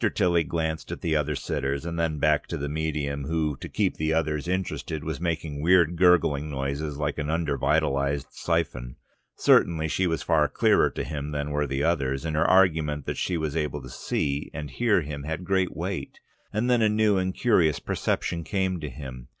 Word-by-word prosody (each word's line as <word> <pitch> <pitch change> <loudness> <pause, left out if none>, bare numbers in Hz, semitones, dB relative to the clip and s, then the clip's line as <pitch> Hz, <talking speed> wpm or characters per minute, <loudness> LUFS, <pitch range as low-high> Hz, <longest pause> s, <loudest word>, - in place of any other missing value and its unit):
Tilly 85 -2 +3
glanced 80 0 -3
at - - -6
the 80 -2 0
other 75 0 0
sitters 70 +2 -2
and 85 0 -3
then 80 -2 0
back 75 0 +2
to 85 - -4
the 70 -1 -3
medium, 75 -2 -2
who, 80 -1 0
to - - -8
keep - - 0
the 80 +1 0
others 75 0 -1
interested, 90 -4 -2
was 80 0 -4
making 80 -4 -2
weird 85 0 +4
gurgling 80 -4 +3
noises 70 +1 -3
like 75 0 -2
an 75 - -2
undervitalised 70 -3 +1
siphon. 75 -8 -2 0.4
Certainly 80 -2 +3
she 95 +4 +1
was 80 -1 -1
far 75 -3 +3
clearer - - +3
to - - -4
him 75 +1 -4
than 75 0 -3
were 75 0 0
the 70 +1 -1
others, 70 -4 0
and 80 -1 -2
her 80 - +3
argument 80 -6 +3
that - - -3
she 90 - -1
was 80 -2 -2
able 75 -4 -2
to - - -9
see 70 +1 -2
and 75 -3 -5
hear 110 -3 +2
him 75 -1 -6
had 80 +4 -4
great 95 0 0
weight. 90 +3 -4 0.3
And 110 +4 0
then 125 -2 +3
a 110 - +4
new 105 -1 +3
and 95 0 0
curious 90 -8 +2
perception 85 -1 -2
came 95 -1 -1
to 75 -2 -5
him. 65 -2 -9
80 Hz, 195 wpm, -26 LUFS, 75-85 Hz, 0.4 s, weird